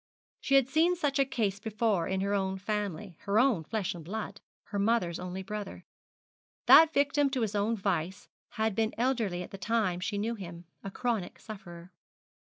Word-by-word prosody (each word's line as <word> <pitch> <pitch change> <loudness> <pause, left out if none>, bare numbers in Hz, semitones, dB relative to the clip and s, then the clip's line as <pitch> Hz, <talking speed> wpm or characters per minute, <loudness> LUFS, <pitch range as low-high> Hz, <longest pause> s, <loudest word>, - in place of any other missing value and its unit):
She 275 - +1
had 270 -2 +5
seen 320 +6 +3
such 290 -5 0
a 275 - +5
case 215 -7 -1
before 215 -4 0
in 190 0 -1
her 200 +1 0
own 190 -1 0
family, 200 -3 -4
her 200 +1 +1
own 235 -8 +3
flesh 200 +3 -2
and 170 -2 -9
blood, 210 +7 -5 0.3
her 205 - -2
mother's 200 -5 +1
only 180 +1 -5
brother. 210 0 -6 0.8
That 320 0 +9
victim 285 -1 +2
to 265 -2 -2
his 220 -2 -1
own 210 +3 +1
vice 190 -2 -2 0.3
had 220 -1 0
been 220 +2 0
elderly 225 -8 0
at - - -11
the 195 - -8
time 200 -3 0
she 205 +3 -2
knew 220 +3 -1
him 175 -5 -8 0.2
a 195 - -4
chronic 230 0 -2
sufferer. 185 -7 -10
210 Hz, 180 wpm, -30 LUFS, 190-235 Hz, 0.8 s, That